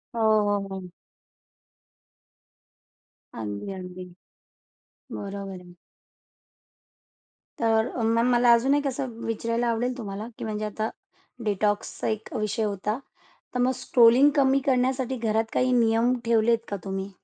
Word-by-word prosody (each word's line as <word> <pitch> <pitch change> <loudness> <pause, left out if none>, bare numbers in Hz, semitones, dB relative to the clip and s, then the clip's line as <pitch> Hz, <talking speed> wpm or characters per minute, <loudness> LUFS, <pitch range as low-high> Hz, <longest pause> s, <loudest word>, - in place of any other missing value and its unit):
हो, 230 - -1 0.3
हो, 200 -1 0
हो. 190 -2 -7 2.4
अगदी, 105 - -5
अगदी. 185 -1 -8 1.1
बरोबर 195 -2 -6
आहे. 175 -1 -15 1.8
तर, 225 0 +2 0.2
म 225 +1 +2
मला 240 0 +5
अजून 245 +4 +3
एक 290 0 0
असं 270 0 -2 0.2
विचारायला 230 +1 -1
आवडेल 245 +2 -1
तुम्हाला 210 -1 -5
की - - -6
म्हणजे 215 -1 -3
आता 215 +1 -3 0.6
डिटॉक्सचा 205 0 -1
एक 220 0 -3
विषय 215 +1 -1
होता, 210 +1 -2 0.6
तर - - 0
मग 250 +1 +3
स्ट्रोलिंग 250 +2 +5
कमी 275 -1 +4
करण्यासाठी 260 0 +1
घरात 225 -1 0
काही 255 0 +2
नियम 235 0 +3
ठेवलेत 230 0 +3
का 205 - -2
तुम्ही? 195 0 -4
225 Hz, 120 wpm, -26 LUFS, 200-245 Hz, 2.4 s, मला